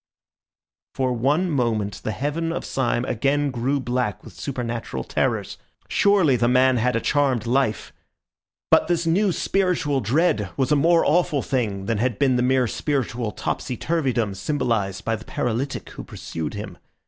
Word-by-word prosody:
For 130 Hz, -1 st, 0 dB
one 145 Hz, +9 st, +1 dB
moment 110 Hz, -7 st, -1 dB
the 110 Hz, -, -2 dB
heaven 150 Hz, +9 st, -2 dB
of 170 Hz, -, -4 dB
Syme 120 Hz, -2 st, 0 dB
again 140 Hz, +4 st, 0 dB
grew 130 Hz, +3 st, 0 dB
black 125 Hz, -5 st, -2 dB
with -, -, -12 dB
supernatural 120 Hz, -, -4 dB
terrors. -, -, -1 dB, 0.3 s
Surely 195 Hz, -9 st, +4 dB
the 120 Hz, 0 st, +2 dB
man 130 Hz, +1 st, +4 dB
had 125 Hz, +2 st, +1 dB
a -, -, +2 dB
charmed 135 Hz, -4 st, +1 dB
life. 125 Hz, -2 st, 0 dB, 0.8 s
But -, -, +5 dB
this 170 Hz, -1 st, 0 dB
new 190 Hz, +5 st, +2 dB
spiritual 170 Hz, -7 st, 0 dB
dread 115 Hz, -, +1 dB
was 135 Hz, +1 st, +1 dB
a -, -, +5 dB
more 165 Hz, +3 st, +4 dB
awful 155 Hz, -4 st, +2 dB
thing 105 Hz, -8 st, -1 dB
than 115 Hz, -1 st, -1 dB
had 120 Hz, -2 st, 0 dB
been 135 Hz, -3 st, +3 dB
the 125 Hz, -, +2 dB
mere 130 Hz, 0 st, +3 dB
spiritual 120 Hz, -3 st, -2 dB
topsy 120 Hz, +5 st, -3 dB
turvydom 130 Hz, -11 st, 0 dB
symbolised 100 Hz, -4 st, -1 dB
by 115 Hz, -, +1 dB
the 110 Hz, -, -10 dB
paralytic 125 Hz, +4 st, -3 dB
who -, -, -8 dB
pursued 80 Hz, +3 st, -6 dB
him. 100 Hz, -3 st, -7 dB
125 Hz, 160 wpm, -23 LUFS, 115-145 Hz, 0.8 s, But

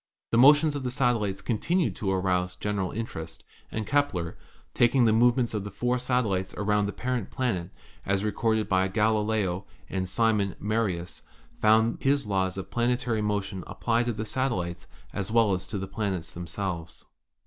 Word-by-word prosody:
The 115 Hz, -, +3 dB
motions 145 Hz, +3 st, +6 dB
of 145 Hz, -, -2 dB
the 130 Hz, -, -2 dB
satellites 115 Hz, -7 st, 0 dB
continued 170 Hz, -, 0 dB
to 100 Hz, -, -2 dB
arouse 90 Hz, -1 st, 0 dB
general 100 Hz, -1 st, -2 dB
interest, 80 Hz, -8 st, -6 dB, 0.3 s
and 110 Hz, -1 st, -3 dB
Kepler, 135 Hz, -, 0 dB, 0.4 s
taking 120 Hz, +1 st, +4 dB
the 110 Hz, -, +4 dB
movements 120 Hz, +1 st, +3 dB
of 105 Hz, -2 st, -2 dB
the 105 Hz, -, -5 dB
four 125 Hz, +5 st, -1 dB
satellites 115 Hz, -7 st, 0 dB
around 105 Hz, 0 st, +1 dB
the -, -, -2 dB
parent 125 Hz, -2 st, -3 dB
planet, 95 Hz, -9 st, -2 dB, 0.3 s
as 100 Hz, 0 st, 0 dB
recorded 110 Hz, +1 st, 0 dB
by 95 Hz, 0 st, +2 dB
Galileo 105 Hz, -2 st, +1 dB, 0.3 s
and 95 Hz, -1 st, -2 dB
Simon 105 Hz, -2 st, +1 dB
Marius, 100 Hz, -5 st, -2 dB, 0.4 s
found 110 Hz, +1 st, +4 dB
that -, -, -16 dB
his 140 Hz, 0 st, +2 dB
laws 95 Hz, -2 st, 0 dB
of 95 Hz, 0 st, -6 dB
planetary 120 Hz, -2 st, 0 dB
motion 100 Hz, -3 st, -2 dB
applied 120 Hz, 0 st, 0 dB
to 120 Hz, -, 0 dB
the 110 Hz, +1 st, -4 dB
satellites 105 Hz, -9 st, -2 dB, 0.3 s
as 100 Hz, -1 st, -3 dB
well 110 Hz, -3 st, +4 dB
as 90 Hz, -, -3 dB
to 105 Hz, -, -4 dB
the 95 Hz, 0 st, -4 dB
planets 95 Hz, -6 st, -3 dB
themselves. 85 Hz, -1 st, -5 dB
105 Hz, 165 wpm, -27 LUFS, 95-120 Hz, 0.4 s, motions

